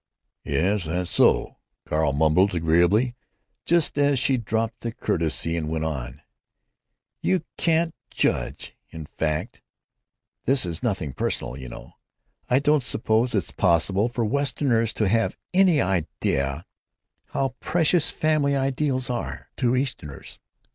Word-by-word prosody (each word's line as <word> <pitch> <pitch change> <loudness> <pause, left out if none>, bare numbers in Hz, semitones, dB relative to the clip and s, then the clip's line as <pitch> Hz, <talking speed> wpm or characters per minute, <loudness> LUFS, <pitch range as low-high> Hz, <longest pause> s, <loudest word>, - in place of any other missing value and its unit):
"Yes, 95 +2 0
that's 90 +2 -2
so," - - +3 0.3
Carl 75 -1 +1
mumbled, 80 +7 +3
agreeably, 85 +9 +2 0.5
just 170 -3 +2
as 145 -1 +3
she 130 +1 +2
dropped 115 -1 -2
the 115 - -4
courtesy 80 -5 -1
and 80 -2 -2
went 80 0 -2
on: 65 -2 -5 1.0
"——you 185 - +1
can't 165 0 +1 0.2
judge—in 80 -1 -3
fact 75 0 -3 0.8
(this 135 -4 +4
is 85 -1 -4
nothing 95 - -2
personal, 60 - -2
you 65 -2 -8
know) - - -11 0.6
I 125 - +4
don't 150 +1 +3
suppose 115 0 +1
it's 100 - -1
possible 95 +4 +2
for 120 -1 -2
Westerners 125 -2 +1
to 110 - 0
have 115 +3 +1 0.2
any 180 -4 +4
idea 80 - -1 0.6
how 135 -2 -2
precious 165 -1 +3
family 150 -2 +1
ideals 135 -1 0
are 120 -1 -5
to 125 -1 +1
Easterners. 125 - -4
110 Hz, 125 wpm, -24 LUFS, 80-135 Hz, 1.0 s, this